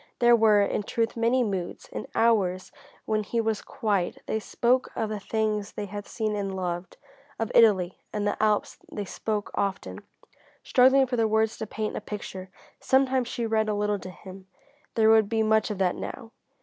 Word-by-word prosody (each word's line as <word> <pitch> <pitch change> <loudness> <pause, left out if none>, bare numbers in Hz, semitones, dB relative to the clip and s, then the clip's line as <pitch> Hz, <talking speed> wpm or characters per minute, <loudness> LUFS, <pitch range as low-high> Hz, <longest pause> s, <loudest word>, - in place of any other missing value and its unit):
There 240 0 +6
were, 215 -3 +5
in 200 - -1
truth, 230 +2 -2
many 235 +2 +2
moods. 190 -5 -4
In - - -6
hours 195 -6 +2 0.3
when 215 -1 0
he 230 +3 -2
was 220 -2 0
quiet 200 -5 -1
they 220 - -1
spoke 245 +4 +1
of 220 - -1
the 215 -1 -3
things 215 0 -2
they 210 - -4
had 205 +1 -7
seen 215 -2 -2
and 195 -2 -3
loved, 175 -1 -4 0.4
of 225 +1 -2
Italy 190 -6 +4
and 210 -1 -2
the 205 - +1
Alps 215 -1 +1
they 205 - -4
spoke 210 +2 -3
often, 195 -1 -3 0.6
struggling 265 +2 +5
for 250 -1 -3
the 225 -1 +3
words 220 0 +1
to 220 - -4
paint 215 +1 -4
a - - -4
picture. 190 -3 -7 0.3
Sometimes 265 -2 +2
she 235 - -3
read 220 -1 +1
a 210 - 0
little 205 0 0
to 185 - -8
him 190 +1 -12 0.5
there 220 -1 +5
would 220 -2 +4
be 225 -1 +1
much 220 0 +2
of 210 - -3
that 185 -2 +2
now. 230 -4 -7
215 Hz, 190 wpm, -26 LUFS, 200-225 Hz, 0.6 s, There